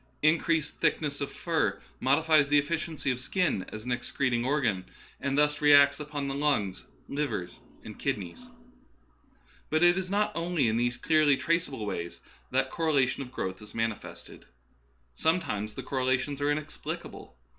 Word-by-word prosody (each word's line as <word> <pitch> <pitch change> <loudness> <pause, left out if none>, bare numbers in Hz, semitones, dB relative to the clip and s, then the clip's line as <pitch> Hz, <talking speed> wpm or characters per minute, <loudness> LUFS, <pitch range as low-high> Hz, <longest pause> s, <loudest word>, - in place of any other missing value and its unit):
Increased 160 0 +2
thick - - +2
ness 145 -2 -4
of 140 - -3
fur 135 - -1 0.2
modifies 150 +1 +3
the 145 - +5
efficiency 155 -1 -1
of 125 - -2
the - - -7
skin 175 - 0
as 110 +1 -7
an 125 - -3
excreting 120 0 0
organ, 125 -9 +1 0.4
and 140 0 -1
thus 150 0 +2
reacts 145 -1 +6
upon 150 -1 -4
the 135 - -2
lungs, 135 -10 0 0.2
liver, 135 -11 -2 0.4
and - - -10
kidneys. 105 - -4 1.2
But 155 +2 +2
it 175 +1 +5
is 185 -1 -4
not 205 +2 +1
only 170 -6 0
in 110 0 +1
these 120 0 0
clearly 155 -1 +3
traceable 160 -8 -1
ways 85 -4 -4 0.3
that - - 0
correlation 140 -5 +1
of 125 -2 -7
growth 95 -6 -4
is 105 0 -13
manifested. 115 -2 -5 0.7
Sometimes 110 - -1
the - - -6
correla 130 -1 +1
tions 140 +1 -5
are 145 - +2
inexplicable. 145 - -5
140 Hz, 155 wpm, -29 LUFS, 120-155 Hz, 1.2 s, reacts